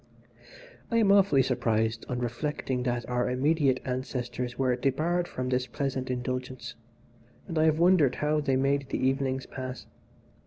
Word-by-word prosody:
"I 230 Hz, -, +1 dB
am 210 Hz, -3 st, +4 dB
often 195 Hz, -9 st, +5 dB
surprised 115 Hz, -3 st, 0 dB
on 125 Hz, -, -2 dB
reflecting 125 Hz, +1 st, -2 dB
that 120 Hz, -1 st, -2 dB
our 125 Hz, 0 st, 0 dB
immediate 135 Hz, 0 st, +2 dB
ancestors 125 Hz, -1 st, -3 dB
were 130 Hz, -2 st, +2 dB
debarred 160 Hz, +8 st, 0 dB
from 130 Hz, 0 st, -4 dB
this 125 Hz, 0 st, 0 dB
pleasant 135 Hz, -3 st, -3 dB
indulgence, 130 Hz, 0 st, -4 dB, 0.7 s
and 165 Hz, -4 st, -2 dB
I 155 Hz, -, +4 dB
have 155 Hz, -1 st, +3 dB
wondered 170 Hz, -6 st, +4 dB
how 150 Hz, +1 st, +1 dB
they 135 Hz, -2 st, +1 dB
made 135 Hz, +1 st, +1 dB
the -, -, -1 dB
evenings 130 Hz, 0 st, 0 dB
pass. 130 Hz, -1 st, -7 dB
130 Hz, 150 wpm, -28 LUFS, 125-150 Hz, 0.7 s, often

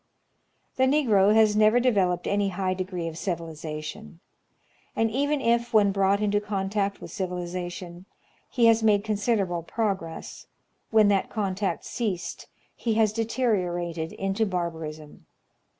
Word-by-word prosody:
The 260 Hz, -, +4 dB
Negro 230 Hz, -8 st, +4 dB
has 215 Hz, -1 st, +5 dB
never 215 Hz, +3 st, +5 dB
developed 190 Hz, -8 st, +1 dB
any 200 Hz, 0 st, +1 dB
high 185 Hz, 0 st, -1 dB
degree 185 Hz, -2 st, -4 dB
of 165 Hz, -, -5 dB
civiliza 160 Hz, -3 st, -5 dB
tion; 190 Hz, +3 st, -9 dB, 0.8 s
and 225 Hz, -1 st, +1 dB
even 285 Hz, +4 st, 0 dB
if, 235 Hz, -1 st, +1 dB
when 205 Hz, -2 st, +5 dB
brought 195 Hz, +1 st, +2 dB
into 205 Hz, 0 st, +1 dB
contact 200 Hz, 0 st, -2 dB
with -, -, -9 dB
civilization, 180 Hz, -1 st, -5 dB, 0.4 s
he 240 Hz, -2 st, +2 dB
has 230 Hz, 0 st, +5 dB
made 210 Hz, -2 st, +3 dB
considerable 205 Hz, -4 st, 0 dB
progress, 190 Hz, -3 st, -4 dB, 0.4 s
when 215 Hz, -2 st, +5 dB
that 195 Hz, -1 st, +1 dB
contact 200 Hz, -2 st, -2 dB
ceased 200 Hz, -7 st, -4 dB, 0.3 s
he 225 Hz, -2 st, -1 dB
has 215 Hz, -2 st, +3 dB
deteriorated 180 Hz, -8 st, -1 dB
into 195 Hz, +3 st, -1 dB
barbarism. 160 Hz, -5 st, -5 dB
200 Hz, 130 wpm, -26 LUFS, 175-220 Hz, 0.8 s, has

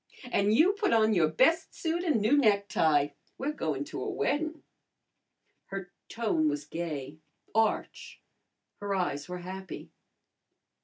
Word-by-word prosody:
"An' 200 Hz, +1 st, +2 dB
you 325 Hz, -, +5 dB
put 405 Hz, -2 st, 0 dB
on 220 Hz, -1 st, +4 dB
your 170 Hz, -5 st, +4 dB
best 320 Hz, -, +2 dB
suit 335 Hz, +1 st, -1 dB
an' 300 Hz, -, +2 dB
new 220 Hz, +7 st, +4 dB
necktie. 200 Hz, -, +3 dB, 0.3 s
We're 280 Hz, +3 st, -2 dB
goin' 150 Hz, -, -2 dB
to 145 Hz, -, -6 dB
a -, -, -2 dB
weddin'." 310 Hz, +2 st, -1 dB, 1.0 s
Her 195 Hz, -2 st, -6 dB, 0.2 s
tone 205 Hz, -10 st, +1 dB
was 145 Hz, 0 st, -3 dB
gay, 155 Hz, -3 st, -5 dB, 0.3 s
arch, 220 Hz, 0 st, -1 dB, 0.6 s
her 200 Hz, -1 st, -2 dB
eyes 145 Hz, -6 st, -2 dB
were 180 Hz, -, -4 dB
happy. 190 Hz, +1 st, -7 dB
200 Hz, 135 wpm, -29 LUFS, -, 1.0 s, you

